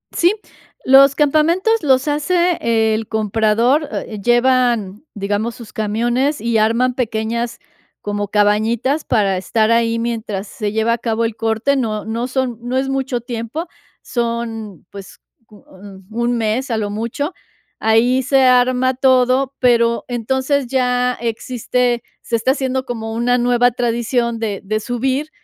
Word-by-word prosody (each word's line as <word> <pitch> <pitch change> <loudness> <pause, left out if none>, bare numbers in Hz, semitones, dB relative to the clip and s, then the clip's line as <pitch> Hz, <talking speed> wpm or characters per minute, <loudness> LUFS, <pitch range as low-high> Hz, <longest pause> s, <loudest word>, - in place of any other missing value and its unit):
Sí. 350 +4 +3 0.5
Los 270 +1 +6
campamentos 325 +9 +2
los 265 0 +2
hace 345 +4 +1 0.4
el 220 -1 -4
comprador, 225 +6 +1
eh, 215 -2 -5
llevan, 240 -3 +2
digamos, 205 +3 -2
sus 235 -3 -12
camiones 240 +7 0
y 230 -1 0
arman 235 +4 +2
pequeñas 235 0 -2 0.4
como 205 -1 -3
cabañitas 220 +8 +1
para 200 -5 +1
estar 215 +4 0
ahí 230 0 +2
mientras 220 -4 -3
se 210 -6 -4
lleva 220 +1 +1
a - - -1
cabo 230 0 -1
el 225 -1 -2
corte. 225 +5 0
No 220 -5 -2
no 230 +2 -3
son 255 -3 -2
no 245 +2 -2
es 270 +1 -1
mucho 265 -3 -2
tiempo. 240 +8 -5 0.3
Son, 230 - -4
pues, 200 -2 -11 0.3
co 210 -1 -19 0.5
1 235 +2 -1
mes 230 +4 -1
a 225 - 0
lo 210 -2 -2
mucho. 235 - -3 0.5
Ahí 240 +4 +3
se 270 +1 +3
arma 255 +1 +3
todo, 260 0 +2
pero, 235 -2 +2
entonces 260 +3 -1
ya 250 -1 +1
existe, 240 +1 -1 0.2
se 235 - -2
está 230 +3 +2
haciendo 265 -1 -2
como 225 -2 -5
una 245 +2 +1
nueva 245 0 +3
tradición 235 0 -1
de 210 -3 -3
de 215 +2 -1
subir, 260 +6 -2
240 Hz, 140 wpm, -18 LUFS, 220-260 Hz, 0.5 s, Los